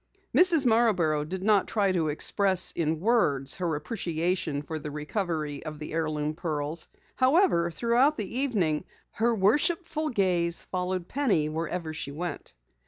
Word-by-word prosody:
Mrs. 345 -6 +5
Marborough 200 -11 +2
did 185 +5 -5
not 205 -2 +3
try 200 -3 +1
to 170 -4 0
express 185 +5 +2
in 160 -1 -1
words 150 - +2
her 170 -3 -1
appreciation 165 -3 -2
for 155 +1 -5
the 150 - -6
recovery 150 -1 -3
of 155 0 -7
the 150 0 -7
heirloom 155 -2 -1
pearls. 155 -1 -3 0.3
However, 260 - +3
throughout 235 - +2
the 220 +4 -3
evening, 190 - 0 0.3
her 235 +1 +1
worshipful 305 - +1
gaze 180 - +1
followed 180 -1 -3
Penny 210 - +1
wherever 160 +1 -4
she 155 -2 -5
went. 155 - -6
175 Hz, 140 wpm, -27 LUFS, 155-220 Hz, 0.3 s, Mrs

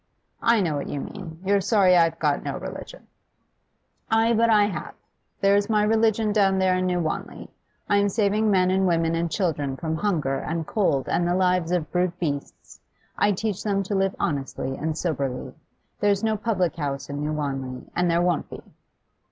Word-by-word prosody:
'I 230 -2 +3
know 160 -5 0
what 140 - -4
you 145 - -3
mean. 165 +1 -8
You're 200 +1 +3
sorry 190 -3 +4
I've 165 -1 +3
got 150 -3 +1
no - - -4
religion. - - -8 1.0
Ay, 225 +1 +3
but 230 +1 +3
I 210 -2 +5
have! 185 -7 -5 0.4
There's 200 +1 +3
my 210 -1 +3
religion, 220 0 +2
down 195 -2 +3
there 190 -1 +2
in 185 0 0
New 180 -1 0
Wanley. 160 -2 -4 0.4
I'm 205 0 +3
saving 210 +1 +1
men 185 -2 +3
and 190 0 +2
women 165 -1 +1
and 165 0 -1
children 150 -7 -1
from 160 -2 -2
hunger 155 -9 0
and 165 +2 -3
cold 150 -11 0
and 175 - +1
the 175 - +1
lives 180 -2 +1
of 175 -4 -1
brute 180 -1 0
beasts. 145 -5 -5 0.4
I 205 - +2
teach 205 0 -2
them 200 -2 0
to 195 - -4
live 195 0 +1
honestly 135 -2 -2
and 155 +2 -3
soberly. 140 -7 -3 0.5
There's 205 0 +2
no 220 -1 +1
public 205 -6 -1
house 140 -3 -3
in 145 0 -5
New 150 +1 -2
Wanley, 135 -4 -4
and 175 0 +1
there 170 +1 +2
won't 175 -3 0
be. - - -9
180 Hz, 185 wpm, -24 LUFS, 155-205 Hz, 1.0 s, I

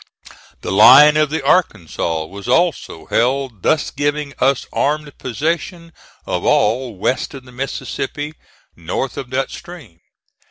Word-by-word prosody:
The - - -4
line 135 +9 +8
of 155 -1 +2
the 155 -2 -3
Arkansas 85 - 0
was 100 +6 -10
also 165 - 0
held, 125 -3 -1
thus 155 - +1
giving 145 0 -2
us 135 0 +1
armed 150 0 -1
possession 165 +5 -3 0.3
of - - -3
all 120 +2 +1
west 130 +8 -2
of 135 - -10
the 125 - -14
Mississippi, 135 +3 -5 0.4
north 85 +10 -4
of 130 - -6
that 130 +1 -2
stream. 165 - -11
135 Hz, 130 wpm, -18 LUFS, 115-150 Hz, 0.4 s, line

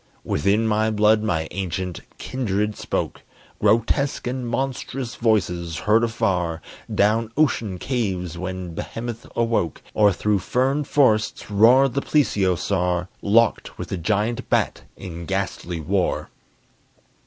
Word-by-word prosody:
Within 100 +9 +1
my 110 0 +2
blood 105 0 +3
my 85 -7 -1
ancient 95 -1 -3 0.2
kindred 105 -4 -2
spoke - - -3 0.4
Grotesque 115 +6 +2
and 125 0 -3
monstrous 130 0 -3
voices, 90 -7 0
heard 110 +3 +3
afar 90 -7 0 0.3
Down 110 +2 +2
ocean 115 -10 +1
caves 95 - -2
when 90 -1 -5
behemoth 115 +6 -6
awoke, 115 -9 0
Or 105 -1 +5
through 100 +2 +1
fern 135 +8 0
forests 110 -8 +2
roared 120 +6 +5
the 140 - 0
plesiosaur 95 - +1
Locked 110 +2 +2
with - - -6
the 95 - -2
giant 110 +8 -1
bat - - +1 0.2
in 85 -3 -7
ghastly 95 -3 -3
war. 90 +4 -1
105 Hz, 120 wpm, -23 LUFS, 90-115 Hz, 0.4 s, Or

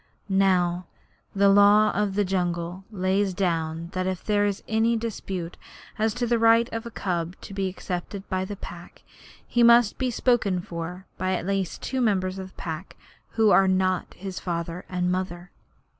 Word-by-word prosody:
Now 180 -2 +2 0.5
the 200 0 +4
Law 205 +2 +6
of 205 -1 -1
the 205 0 +2
Jungle 175 0 -2
lays 190 -1 0
down 165 -3 -1
that 185 0 -1
if 185 -1 -3
there 205 -1 +2
is 200 -1 -3
any 225 +1 +2
dispute 195 -6 -5 0.4
as 220 0 +1
to 245 0 -1
the 235 0 +1
right 230 +1 +5
of 225 +1 -4
a - - -5
cub 175 -5 -3
to - - -9
be 195 -1 -1
accepted 185 +1 -5
by 185 -1 -1
the 205 +2 -5
Pack, 175 -2 -11 0.4
he 240 - 0
must 235 -2 +6
be 260 -1 +1
spoken 225 -6 +1
for 175 +2 -6
by 185 0 0
at 175 - -4
least 195 -2 -2
two 260 -1 -1
members 190 -4 +1
of 190 - -6
the 190 - -19
Pack 165 +1 -6 0.4
who 220 -2 +4
are 195 - +6
not 185 -1 0
his 190 -1 -6
father 170 0 -4
and 180 -1 0
mother. 180 -1 -4
190 Hz, 175 wpm, -25 LUFS, 180-210 Hz, 0.5 s, Law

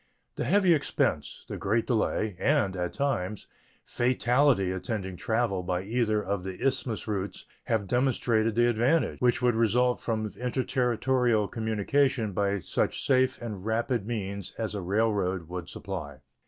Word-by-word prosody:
The - - -2
heavy 185 +4 +4
expense, 150 - -1
the - - -5
great 110 +4 0
delay, 110 -3 0
and, 135 -10 +2
at 90 -1 -2
times, 110 -8 -2 0.4
fatality 125 -4 +2
attending 95 0 -4
travel 110 -2 0
by 90 0 -2
either 110 0 0
of 100 -1 -2
the 95 -1 -6
Isthmus 130 -4 -1
routes 100 -3 -3 0.2
have 110 -3 0
demonstrated 115 -2 +1
the 120 +1 +4
advantage 120 +8 +1
which 125 0 +2
would 120 -1 +4
result 120 +2 +2
from 110 -2 -1
interterritorial 125 -2 +1
communication 110 +1 +1
by 100 +1 +1
such 95 - -2
safe 130 -1 +2
and 105 -5 -5
rapid 110 0 -1
means 100 -4 -4
as 110 -1 -2
a 100 - -3
railroad 95 -3 0
would 90 0 -6
supply. 75 -9 -6
110 Hz, 140 wpm, -28 LUFS, 95-125 Hz, 0.4 s, heavy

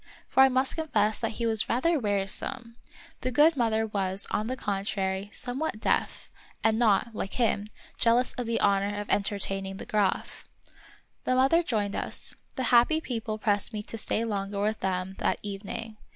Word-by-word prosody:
For 265 - +4
I 265 - +8
must 260 +3 0
confess 220 -10 +1
that 225 -1 -2
he 235 - -3
was 220 -1 +2
rather 310 +7 +2
wearisome. 225 +3 -2 0.4
The 255 - -2
good 300 +6 +5
mother 225 -3 +1
was, 195 -2 0
on 215 - 0
the 255 +2 -3
contrary, 195 -2 -2
somewhat 255 +1 -3
deaf, - - 0 0.4
and 220 0 +3
not, 225 0 +3
like 195 -2 -4
him, 215 -4 0 0.3
jealous 240 +2 +3
of 245 -2 -4
the 230 - 0
honor 200 +1 +2
of 205 - -5
entertaining 195 -1 -1
the - - -7
Graf. 205 -3 -1 0.8
The 255 - +2
mother 270 +6 +4
joined 210 -10 -1
us. - - -3 0.2
The 260 - -2
happy 245 +7 +5
people 225 -7 -4
pressed 210 0 0
me 210 -1 -4
to 225 - -7
stay 225 - 0
longer 200 -2 -3
with 215 +1 0
them 190 0 -2
that - - +1
even 200 0 -6
ing. 225 -2 -6
220 Hz, 175 wpm, -28 LUFS, 200-245 Hz, 0.8 s, I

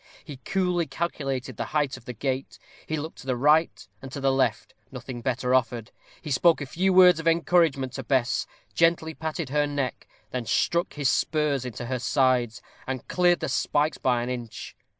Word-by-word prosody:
He 145 -3 -9
coolly 180 +2 -1
calculated 135 -4 -3
the - - -2
height 145 -3 0
of - - -14
the 125 - -6
gate; 130 +3 -3 0.3
he 155 - -2
looked 155 +2 -6
to 135 - -12
the 130 - +1
right 150 +5 +2
and 135 - -9
to 140 - -5
the 135 0 +2
left 125 -4 0 0.2
nothing 130 -1 -7
better 125 +1 -1
offered; 120 -2 0 0.3
he 150 - -5
spoke 165 +6 +4
a 145 - -4
few 185 +8 0
words 180 -2 +7
of 165 - -4
encouragement 165 -6 +2
to 135 - -5
Bess, 130 -1 0 0.3
gently 165 -1 +2
patted 160 -2 -4
her 145 +1 +1
neck, 140 -3 -3 0.2
then 125 -3 -4
struck 170 +2 +1
his 145 -2 0
spurs 150 -3 +1
into 120 -1 -6
her 130 +1 -2
sides, 125 -2 +1 0.2
and 130 -2 -4
cleared 175 -1 +2
the - - -1
spikes 150 +1 0
by 125 -2 +1
an 120 - -4
inch. 120 -3 -7
135 Hz, 190 wpm, -26 LUFS, 125-160 Hz, 0.3 s, words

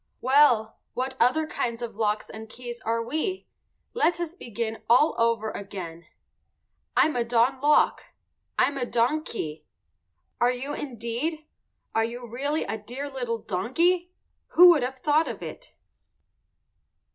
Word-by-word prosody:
Well, 255 -5 +4 0.2
what 260 +1 -2
other 255 +7 +3
kinds 240 -5 -3
of 230 -3 -6
locks 210 -1 0
and 220 0 -9
keys 240 0 -8
are 230 0 -1
we? 315 - -2 0.5
Let 350 -7 +2
us 340 -2 -3
begin 230 - -5
all 250 +7 +5
over 230 -2 +1
again. 180 -4 -7 0.9
I'm 310 - +4
a 240 - +1
don 240 +3 +2
lock. 295 +1 +3 0.5
I'm 280 -1 +2
a 250 - 0
don 245 +7 +1
key. 155 - -6 0.7
Are 240 +1 +4
you 260 +3 -4
indeed? 265 +5 -3 0.5
Are 225 - +2
you 240 +2 -5
really 285 +7 -1
a 220 - -4
dear 260 +7 -6
little 240 -4 -3
donkey? 340 - +1 0.4
Who 355 +1 +9
would 315 -5 +3
have 255 +2 -3
thought 300 +4 +2 0.2
it? - - -9
245 Hz, 135 wpm, -26 LUFS, 230-295 Hz, 0.9 s, Who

